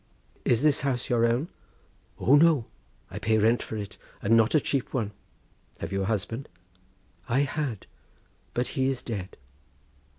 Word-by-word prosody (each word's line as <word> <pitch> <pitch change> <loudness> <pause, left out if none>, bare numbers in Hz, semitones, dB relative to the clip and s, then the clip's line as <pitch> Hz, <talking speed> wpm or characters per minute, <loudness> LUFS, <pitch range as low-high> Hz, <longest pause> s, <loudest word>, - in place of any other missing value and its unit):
"Is 120 +3 +3
this 150 -2 +4
house 130 -4 -1
your 115 -1 +4
own?" 125 +9 0 0.7
"O 130 - +3
no! 150 -4 +6 0.5
I - - -5
pay 110 0 +2
rent 115 +3 +3
for 110 - -5
it, 100 -2 -7 0.2
and 115 +3 +3
not 115 +5 +4
a - - +7
cheap 135 -2 -2
one." 110 -5 -1 0.7
"Have - - -5
you 95 0 0
a - - 0
husband?" 110 +5 -2 0.8
"I 130 +4 +3
had, 140 -6 -2 0.7
but 125 +1 0
he 130 0 +1
is 135 -2 -2
dead." 100 -5 -5
120 Hz, 160 wpm, -27 LUFS, 110-135 Hz, 0.8 s, a